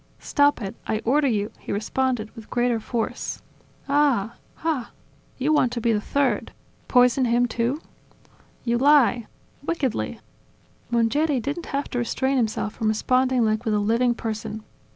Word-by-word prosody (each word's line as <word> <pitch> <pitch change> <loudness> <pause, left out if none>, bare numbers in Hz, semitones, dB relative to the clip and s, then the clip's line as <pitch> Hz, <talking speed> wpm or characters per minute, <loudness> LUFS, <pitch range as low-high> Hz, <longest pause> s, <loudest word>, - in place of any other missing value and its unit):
"Stop 285 -5 +2
it! 195 - -4
I 220 - +1
order 280 +4 +3
you!," 210 -4 0
he - - -7
responded 220 +2 -1
with 225 -2 -11
greater 240 -1 +1
force. 225 0 -3 0.4
"Ah! 275 -7 +2 0.3
Ah! 310 -7 -1 0.5
You 285 +4 +1
want 255 -5 +3
to 235 - -2
be 230 0 +2
the 210 - 0
third... 280 +4 +1
enjoying... - - -15 0.3
Poison 250 +1 +4
him 240 +1 +3
too?". 235 +5 -1 0.8
"You 235 -1 +1
lie! 255 -5 +4 0.4
Wickedly!" 290 -6 -2 0.7
Mongeri 250 +5 +2
didn't 285 +8 -4
have 280 +1 -2
to 245 - -1
restrain 265 +3 0
himself 220 -3 -1
from 220 - -2
responding 255 +3 +2
like 215 +1 0
with 220 -3 0
a - - +2
living 230 +4 +2
person. 220 -1 -5
245 Hz, 150 wpm, -24 LUFS, 225-270 Hz, 0.8 s, Poison